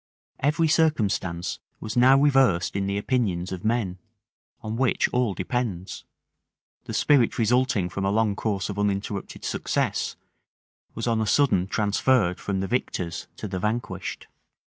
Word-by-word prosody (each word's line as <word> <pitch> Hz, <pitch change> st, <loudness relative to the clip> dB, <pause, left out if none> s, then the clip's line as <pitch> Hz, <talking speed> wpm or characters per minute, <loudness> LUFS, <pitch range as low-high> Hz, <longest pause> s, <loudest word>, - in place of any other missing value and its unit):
Every 150 Hz, +4 st, +2 dB
circumstance 110 Hz, -, +1 dB, 0.2 s
was 110 Hz, +2 st, -5 dB
now 130 Hz, +2 st, +6 dB
reversed 135 Hz, -13 st, +3 dB
in 100 Hz, 0 st, -1 dB
the 100 Hz, 0 st, -1 dB
opinions 100 Hz, -6 st, -1 dB
of 95 Hz, -1 st, -5 dB
men, 110 Hz, -5 st, 0 dB, 0.6 s
on 110 Hz, 0 st, -4 dB
which 130 Hz, +1 st, +2 dB
all 125 Hz, -6 st, 0 dB
depends: 110 Hz, -8 st, -3 dB, 0.8 s
the -, -, -6 dB
spirit 135 Hz, -6 st, +3 dB
resulting 120 Hz, -3 st, +2 dB
from 95 Hz, +2 st, -4 dB
a -, -, +2 dB
long 105 Hz, 0 st, +1 dB
course 100 Hz, -3 st, -2 dB
of 100 Hz, 0 st, -5 dB
uninterrupted 100 Hz, 0 st, -2 dB
success, -, -, -1 dB, 0.8 s
was 115 Hz, -, -3 dB
on 115 Hz, -2 st, +1 dB
a 110 Hz, -, -1 dB
sudden 125 Hz, -11 st, +3 dB
transferred 105 Hz, -1 st, +1 dB
from 95 Hz, -2 st, -2 dB
the 95 Hz, -, -2 dB
victors 90 Hz, -8 st, -2 dB
to 105 Hz, -, -6 dB
the 95 Hz, -1 st, -4 dB
vanquished. 110 Hz, +5 st, -3 dB
105 Hz, 140 wpm, -25 LUFS, 95-125 Hz, 0.8 s, now